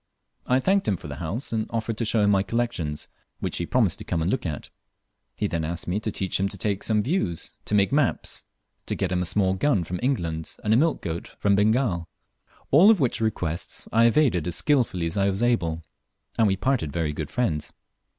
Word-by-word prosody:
I 125 +1 +3
thanked 195 +7 +2
him 100 -4 +1
for - - -10
the 70 -2 -7
house, 95 - -4
and 110 -1 -1
offered 115 0 -2
to 115 - -1
show 110 -1 +2
him 100 - +4
my 100 -1 +4
collections, 100 -9 -2 0.3
which - - -2
he - - -2
promised - - +2
to - - -7
come 85 - -2
and 90 - 0
look 130 - -1
at. 75 -4 -6 0.6
He - - -2
then 85 -1 -1
asked 85 +2 -4
me 90 +4 0
to 110 0 -3
teach 95 -2 -1
him 100 +1 +1
to - - -7
take 100 -2 -1
views 105 - 0
to 105 - 0
make 100 -1 +3
maps 145 -2 0 0.4
to - - 0
get 95 -2 -2
him 90 -1 +1
a - - -1
small 95 0 +2
gun 100 -1 +1
from 90 +2 -4
England, 85 - -2
and 105 0 +2
a - - +6
milch 155 +6 +2
goat 85 0 -4
from 100 - +2
Bengal; 105 -4 +2 0.6
all 170 +10 +7
of 220 -4 +5
which 130 -5 +1
requests 90 -7 -2
I 115 +1 +5
evaded 115 - +3
as 85 - -3
skilfully 120 - +1
as 85 +5 -3
I 100 0 +3
was 100 +4 -1
able, 85 -9 +1 0.5
and 115 -2 +3
we 95 - +2
parted 110 - 0
very 80 -2 -1
good 75 -1 -5
friends. 80 -12 -1
100 Hz, 220 wpm, -25 LUFS, 85-120 Hz, 0.6 s, all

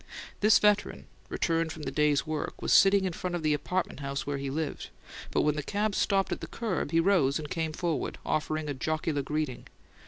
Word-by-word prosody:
This 215 +1 +6
veteran, 210 0 +1 0.2
returned 165 -1 0
from 160 -1 -8
the - - -3
day's 150 -2 +2
work, 155 -1 -4
was - - +1
sitting 195 0 +6
in 185 - -1
front 180 +1 -3
of 170 - -4
the 155 -1 +3
apartment 180 +4 -2
house 140 -1 -3
where 140 -1 -2
he 135 0 -3
lived, 155 +3 -3 0.4
but - - +1
when 150 0 +2
the 150 - -2
cab 205 +7 -1
stopped 195 0 +1
at - - -3
the - - -5
curb 210 -11 -2
he 165 - +2
rose 165 -7 +3
and 155 -2 -5
came 160 -1 -1
forward, 160 -3 -2
offering 155 0 -1
a 145 - -2
jocular 155 +1 -1
greeting. 150 -1 -3
155 Hz, 210 wpm, -29 LUFS, 150-185 Hz, 0.4 s, This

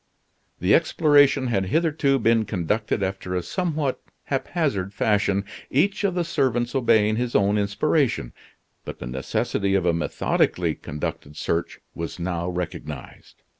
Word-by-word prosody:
The 90 +4 +3
exploration 145 -4 +4
had 100 -6 0
hitherto 155 - +2
been 115 -2 +2
conducted 105 +2 -1
after 95 -1 -3
a 90 - -1
somewhat 155 - -2 0.2
haphazard 135 - -1
fashion, 100 -2 +1 0.2
each 195 +10 +1
of 195 -3 +1
the 175 - +1
servants 125 -7 0
obeying 110 -5 +3
his 120 0 -2
own 100 0 +3
inspiration; 105 - 0 0.5
but - - -7
the - - -7
necessity 65 +9 -1
of 95 -2 +1
a 85 - +3
methodically 85 - 0
conducted 75 0 -6
search 85 +1 -2
was 85 0 -5
now 85 0 -2
recognized. 80 -6 -7
105 Hz, 130 wpm, -24 LUFS, 90-140 Hz, 0.5 s, exploration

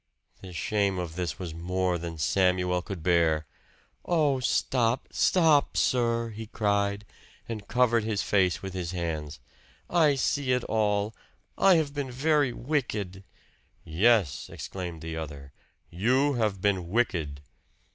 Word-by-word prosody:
The 95 - -9
shame 100 +2 0
of 85 -3 -4
this 90 -2 -3
was 85 -4 -6
more 90 +1 -1
than 85 -1 -6
Samuel 90 +2 +1
could 90 -3 -7
bear. 80 -3 +2 0.6
"Oh, 150 -6 +2
stop, 125 -1 +1
stop, 160 -6 +3
sir!" 115 -2 +1
he 110 +1 -8
cried, 100 -1 0 0.4
and 110 -3 -6
covered 120 -2 +2
his 105 -2 -1
face 95 -3 +1
with 95 -1 -5
his 90 -2 -4
hands. 80 -4 -4 0.5
"I 155 -5 +4
see 135 0 0
it 125 -1 0
all! 105 -1 0 0.4
I 190 -2 +5
have 155 -3 0
been 145 -2 -3
very 145 +1 +2
wicked!" 115 -9 -3 0.6
"Yes!" 95 - +2
exclaimed 90 -4 -6
the 80 0 -5
other. 70 -3 -7 0.4
"You 130 - +2
have 105 -6 -1
been 95 -4 0
wicked." 85 -10 -1
100 Hz, 135 wpm, -27 LUFS, 85-125 Hz, 0.6 s, I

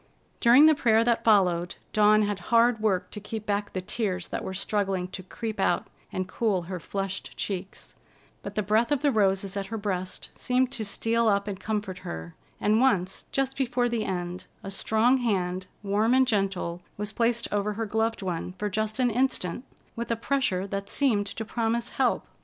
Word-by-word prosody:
During 245 +6 +7
the 315 - +7
prayer 230 -5 +3
that 235 -1 +1
followed, 180 -5 +3 0.2
Dawn 215 0 +5
had 205 -1 -1
hard 235 0 +4
work 205 -4 0
to 210 - -6
keep 215 +1 -6
back 205 0 -1
the 185 - -2
tears 185 -4 -2
that - - -3
were 190 - -4
struggling 195 -2 -1
to 185 - -6
creep 215 +3 -6
out 175 - +1 0.2
and 185 0 -2
cool 195 -3 0
her 180 +1 -5
flushed 195 +3 -4
cheeks; 195 -1 -5 0.5
but - - -7
the 210 - 0
breath 220 +6 +2
of 290 -1 +1
the 290 - +4
roses 195 -3 +1
at 195 -1 -3
her 225 - -4
breast 185 -3 -3
seemed 255 +1 +1
to 225 - -3
steal 225 +3 +1
up 200 -1 +2
and 195 -2 -4
comfort 205 -4 -3
her, 80 +1 -7 0.3
and 215 +3 +3
once, 195 -8 +1
just 270 -1 0
before 245 -2 +1
the 235 -2 -1
end, 180 -2 -4 0.2
a 195 - -6
strong 220 +6 +3
hand, 185 -6 -1 0.2
warm 210 +4 +2
and 260 0 +4
gentle, 195 -5 -1 0.2
was 210 +1 -3
placed 235 0 +1
over 205 +1 0
her 225 +2 -2
gloved 220 0 -1
one 180 -1 -3
for 205 +2 -3
just 215 +2 -1
an 250 -2 +2
instant, 245 -5 0 0.3
with 235 +1 -4
a 230 - +2
pressure 230 -6 0
that 200 0 -4
seemed 220 -8 +1
to 225 +2 -5
promise 230 +1 -1
help. 260 -2 +1
210 Hz, 190 wpm, -27 LUFS, 190-230 Hz, 0.5 s, During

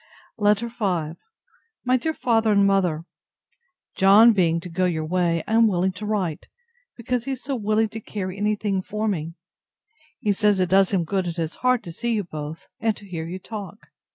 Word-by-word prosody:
LETTER 210 +2 +2
V 185 -9 -1 0.7
MY 255 +1 +3
DEAR 320 +6 -2
FATHER 225 -3 +2
AND 200 -1 +4
MOTHER, 180 -5 +1 0.9
John 210 +5 +7
being 170 -4 +2
to 180 - -8
go 180 +2 0
your 160 -3 -1
way, 170 -1 0
I 220 - -2
am 225 0 +6
willing 190 -1 +1
to 210 +3 -7
write, 190 -7 -2 0.5
because 245 0 -2
he 275 - -2
is 255 - -8
so 275 0 -2
willing 215 -1 +1
to 220 - -7
carry 190 -4 -5
any 210 +1 +1
thing 200 -2 -1
for 210 +3 -3
me. 165 -5 -3 0.8
He 210 -5 0
says 210 -1 +2
it 180 -1 +1
does 190 +1 +4
him 190 -4 +1
good 190 +2 -1
at 170 - -3
his 165 -1 -3
heart 250 -1 +2
to 170 - -7
see 235 +8 -2
you 210 -2 0
both, 155 -2 -7
and 220 -1 0
to 205 - -13
hear 165 -3 -5
you 180 +2 -5
talk. 205 0 -9
200 Hz, 200 wpm, -23 LUFS, 175-220 Hz, 0.9 s, John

